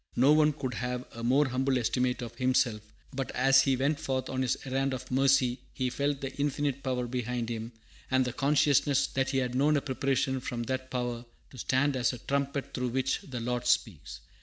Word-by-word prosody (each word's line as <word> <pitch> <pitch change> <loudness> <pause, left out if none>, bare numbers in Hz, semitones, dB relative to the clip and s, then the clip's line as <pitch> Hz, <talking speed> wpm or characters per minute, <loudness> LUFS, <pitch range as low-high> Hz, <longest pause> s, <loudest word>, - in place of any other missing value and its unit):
No 130 +4 +5
one 155 0 +5
could 135 -4 -4
have 125 0 -3
a 115 - -7
more 135 +4 +3
humble 130 +1 +1
estimate 125 +1 0
of 115 -1 -7
himself; 125 -4 +1 0.3
but 135 0 -3
as 135 +1 +5
he 135 -1 +2
went 140 +4 0
forth 135 -4 -2
on 130 0 -1
his 130 - +1
errand 135 0 0
of 130 - -9
mercy 130 -1 +3 0.2
he 130 -2 -1
felt 140 +1 -1
the 135 -1 -5
Infinite 145 -1 -1
Power 125 -2 -1
behind 120 -1 -3
him, 115 0 -4 0.4
and 130 0 +3
the 125 - -3
consciousness 145 -1 +3
that 135 0 -1
he 135 - 0
had 125 -2 0
known 145 +4 +3
a - - 0
preparation 135 -1 0
from 120 -1 -4
that 130 +2 -3
Power 120 -1 -3 0.3
"to 130 - -13
stand 135 +4 +1
as 125 0 +1
a - - -6
trumpet 140 +2 -2
through 125 -1 -1
which 130 +2 0
the 125 -3 -6
Lord 125 +1 -2
speaks." 95 - -1
130 Hz, 205 wpm, -29 LUFS, 125-135 Hz, 0.4 s, No